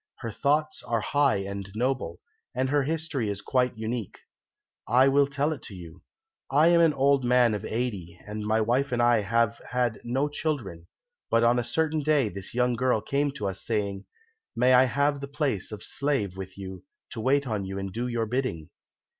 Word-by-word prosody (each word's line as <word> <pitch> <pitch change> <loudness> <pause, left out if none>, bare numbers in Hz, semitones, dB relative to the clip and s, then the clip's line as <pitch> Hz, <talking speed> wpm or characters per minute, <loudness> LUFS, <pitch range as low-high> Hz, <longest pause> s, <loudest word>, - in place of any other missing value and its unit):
Her 115 -3 -4
thoughts 150 +7 0
are 115 -2 -1
high 145 +4 +2
and 100 0 -6
noble, 120 -8 -2 0.3
and 130 +1 0
her 145 +1 +3
history 150 -5 -2
is 100 -1 -3
quite 125 +1 0
unique. 110 -1 -4 0.7
I 125 +4 +5
will 140 +1 +4
tell 145 +2 0
it 145 - -9
to 100 - -9
you. 85 0 -11 0.5
I 150 +5 +5
am 170 -1 +5
an 160 -3 +4
old 140 0 +3
man 125 -2 +4
of 105 - -3
eighty, 100 -8 -3
and 105 0 -5
my 110 +1 +1
wife 125 +5 +1
and 120 - 0
I 120 -2 +4
have 115 +2 +1
had 125 -3 -1
no 130 +5 0
children, 120 - -4 0.4
but 115 - +3
on 120 +1 +4
a - - -1
certain 160 +4 0
day 145 -6 +2
this 100 +3 -9
young 125 0 +2
girl 125 -1 +1
came 140 +6 0
to 105 -7 -3
us 95 0 -4
saying, 100 -3 -2 0.5
"May 125 +2 +4
I 125 +1 +7
have 140 +2 +1
the 140 - -5
place 140 - -2
of 105 -1 -7
slave 135 -10 -1
with 95 0 -8
you, 95 -2 -8 0.3
to 110 - -5
wait 140 +3 +2
on 110 -5 -2
you 95 0 -5
and 95 -1 -5
do 120 +2 -2
your 120 -2 -1
bidding?" 115 - -3
120 Hz, 195 wpm, -27 LUFS, 105-140 Hz, 0.7 s, I